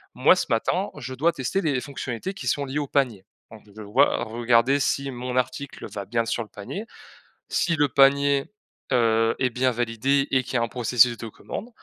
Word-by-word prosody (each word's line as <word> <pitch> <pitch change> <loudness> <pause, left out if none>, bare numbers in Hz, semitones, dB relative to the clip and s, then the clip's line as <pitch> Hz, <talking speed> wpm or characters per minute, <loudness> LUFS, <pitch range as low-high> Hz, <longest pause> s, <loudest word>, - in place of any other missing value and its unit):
Moi, - - +5
ce - - -2
matin, - - 0
je 130 +1 -6
dois 160 +6 +2
tester 135 +9 -2
les 145 -7 0
fonctionnalités 135 - -5
qui 140 -10 -8
sont 140 +3 0
liées 135 +2 -3
au 145 - -3
panier. 125 -9 0 0.3
Donc, 110 -1 -12
je - - -18
vais 110 +1 -9
voi 120 +6 +2
regarder 120 +4 +2
si 140 0 0
mon 125 0 -4
article 130 +2 -3
va 100 -1 -5
bien 115 +2 -1
sur 115 +1 -2
le 110 - -16
panier, 145 - -7 0.6
si 170 - +1
le 145 -2 +2
panier, 140 +1 +4 0.5
heu, 115 -2 +3
est 130 - +2
bien 125 +1 +1
validé 120 +4 0
et 130 - +3
qu'il - - -7
y - - +4
a - - +1
un 115 - -1
processus 120 -1 +3
de 115 - -7
commande, 205 - -8
125 Hz, 210 wpm, -24 LUFS, 115-140 Hz, 0.6 s, Moi